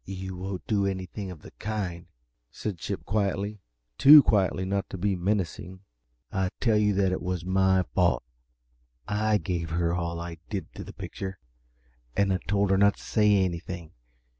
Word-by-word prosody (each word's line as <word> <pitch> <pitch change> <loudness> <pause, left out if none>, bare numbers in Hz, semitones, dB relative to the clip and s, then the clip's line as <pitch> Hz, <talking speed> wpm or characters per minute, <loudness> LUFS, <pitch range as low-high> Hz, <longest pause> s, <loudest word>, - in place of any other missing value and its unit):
"You 95 -1 -6
won't 95 0 -5
do 100 -3 +1
anything 95 +1 -4
of 85 -5 -10
the - - -11
kind," 95 -6 -4 0.4
said 100 -6 -5
Chip, 95 +2 -4
quietly 100 0 -1 0.4
too 145 +1 +10
quietly 95 -3 +2
not 100 +1 -2
to - - -6
be 100 +2 0
menacing. 95 -1 -2 0.5
"I 95 -1 0
tell 115 -3 +2
you 105 0 +3
that 95 -1 +1
was 90 -1 -3
my 95 0 +3
fault 85 -11 +2 0.8
I 105 +1 +2
gave 85 -5 -3
her 85 +1 0
all 85 -1 -2
I 85 -1 -6
did 100 -3 -5
to - - -7
the - - -9
picture, 95 0 -6 0.8
and 100 -1 +3
I 90 - 0
told 100 -1 +2
her 95 - +3
not 100 0 +5
to - - -13
say 105 -3 +3
anything. 85 -1 -5
95 Hz, 165 wpm, -27 LUFS, 90-100 Hz, 0.8 s, too